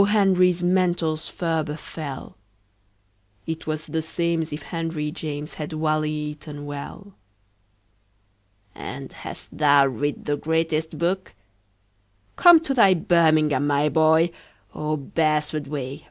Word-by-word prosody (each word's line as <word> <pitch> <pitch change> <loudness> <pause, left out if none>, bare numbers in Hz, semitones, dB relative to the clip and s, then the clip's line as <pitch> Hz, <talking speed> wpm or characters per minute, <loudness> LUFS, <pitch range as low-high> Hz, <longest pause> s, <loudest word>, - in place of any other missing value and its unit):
Henry's 185 -4 +3
mantles 175 -3 +1
ferber 160 -3 -2
fell. 150 -3 -8 1.1
It 160 0 -5
was 155 0 -2
the 160 - -2
same'sif 165 -1 -2
henryjames 155 -2 -4
Had 150 +1 -5
wally 155 -1 0
eaton 150 -1 -6
well. 145 +8 -8 1.6
"And - - -8
hast - - -9
thou 145 -2 +5
writ 140 +3 -2
the 145 0 0
greatest 160 0 -1
book? 180 - -2 1.0
Come 345 -2 +8
to 280 -4 -1
thy 200 -7 +6
birmingham, 155 -5 +3
my 145 +1 +2
boy! 160 +3 +4 0.4
Oh, 155 0 -2
beresford 150 0 -1
way! 140 -2 -5
155 Hz, 110 wpm, -24 LUFS, 150-170 Hz, 1.6 s, Come